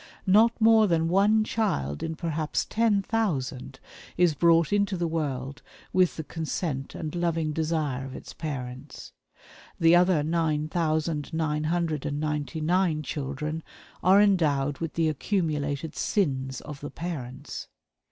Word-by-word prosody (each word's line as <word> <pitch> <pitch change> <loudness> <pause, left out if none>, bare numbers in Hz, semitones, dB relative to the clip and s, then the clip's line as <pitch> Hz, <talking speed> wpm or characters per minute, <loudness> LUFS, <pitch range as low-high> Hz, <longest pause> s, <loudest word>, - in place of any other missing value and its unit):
Not 220 +5 +4
more 220 -1 +6
than 165 -2 +1
one 205 +4 +4
child 75 - -1
in 160 - -3
perhaps 155 -2 -2
ten 215 -3 +2
thousand 135 - -2 0.4
is 175 -3 +4
brought 170 +3 +3
into 200 -2 +1
the 175 - -1
world 140 -4 -3 0.3
with 185 -1 +3
the 160 - -3
consent 155 -3 -4
and 155 -3 -5
loving 165 -3 0
desire 155 -4 -1
of 135 0 -7
its - - -9
parents. 130 -5 -7 0.7
The 165 +1 +6
other 175 -3 +4
nine 155 -1 0
thousand, 155 -3 -1
nine 155 -1 0
hundred, 160 -3 -1
and 145 0 -2
ninety 150 -1 -2
nine 165 -1 +1
children 150 +3 -4 0.4
are 190 +3 +6
endowed 150 -9 +2
with 165 -2 -4
the 165 -1 +2
accumulated 155 -3 -1
sins 135 - -1
of 150 -2 -8
the 145 - -5
parents. 145 -5 -6
160 Hz, 140 wpm, -27 LUFS, 145-175 Hz, 0.7 s, more